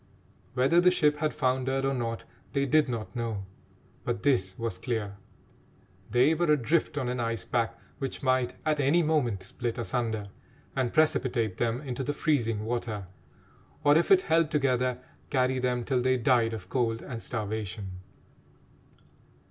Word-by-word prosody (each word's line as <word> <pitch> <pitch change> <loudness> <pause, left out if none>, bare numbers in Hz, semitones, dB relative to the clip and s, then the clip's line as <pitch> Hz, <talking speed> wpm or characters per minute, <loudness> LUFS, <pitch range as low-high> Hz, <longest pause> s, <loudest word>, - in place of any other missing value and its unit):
Whether 135 +7 +4
the 180 - +6
ship 150 -5 +3
had 155 0 +1
foundered 130 0 0
or 135 - +1
not 115 -3 -3 0.3
they 140 -1 +1
did 150 0 +3
not 115 0 -4
know, 115 -5 -3 0.6
but 120 -3 -2
this 95 -10 +1
was 115 -6 -3
clear: 105 -3 -3 0.9
they 125 +7 +4
were 170 -1 +2
adrift 150 +2 +1
on 130 -4 -1
an 125 0 -2
ice 115 -1 -2
pack 115 -1 -1 0.2
which 135 0 -4
might 130 -2 +1
at 155 -1 +1
any 145 +5 +3
moment 125 -11 +1
split 120 +5 -4
asunder 115 -3 -2 0.5
and 130 -3 0
precipitate 120 -9 +1
them 120 +2 0
into 135 -2 -4
the 145 - -1
freezing 115 -9 0
water, 115 -4 -3 0.8
or, 145 0 +6
if 165 - +3
it 190 -1 +6
held 165 -1 +3
together, 130 -4 +1 0.3
carry 130 -1 +1
them 125 -1 0
till 130 -3 +1
they 130 +1 +2
died 115 -2 +3
of 110 - -9
cold 115 -3 0
and 115 -2 -6
starvation. 105 -4 -4
125 Hz, 155 wpm, -28 LUFS, 115-140 Hz, 0.9 s, the